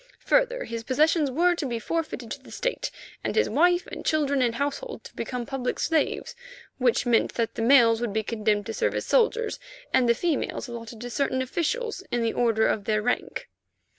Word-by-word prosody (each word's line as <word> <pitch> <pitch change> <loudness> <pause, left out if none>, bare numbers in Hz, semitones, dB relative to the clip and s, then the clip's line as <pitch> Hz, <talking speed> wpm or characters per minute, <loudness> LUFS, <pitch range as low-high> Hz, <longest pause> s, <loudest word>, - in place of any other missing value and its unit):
Further, - - +2
his 230 0 -5
possessions 300 +4 +2
were 345 +7 +3
to 325 -5 -3
be 240 -2 -2
forfeited 325 +8 -3
to - - -5
the - - -15
State, - - -2 0.3
and - - -2
his 450 - +3
wife 355 0 +3
and - - -8
children 285 -3 +1
and 235 -2 +1
household 285 - -3
to - - -12
become 250 -2 -4
public 270 -2 -3
slaves, 325 +8 0 0.4
which 250 -1 +2
meant 235 -2 +2
that 230 -1 -1
the - - -4
males 230 -2 +5
would 240 -3 -1
be 220 +2 -1
condemned 215 -2 0
to 225 - -4
serve - - 0
as - - -2
soldiers, 465 -2 +2 0.3
and 250 -2 +4
the 235 - +5
females 315 -1 -1
allotted 230 -1 -8
to 245 - -5
certain 265 0 0
officials 385 - -2
in 240 -1 0
the 225 - 0
order 225 -2 +2
of 205 - 0
their 215 -1 +1
rank. 245 - -2
255 Hz, 195 wpm, -26 LUFS, 230-330 Hz, 0.4 s, males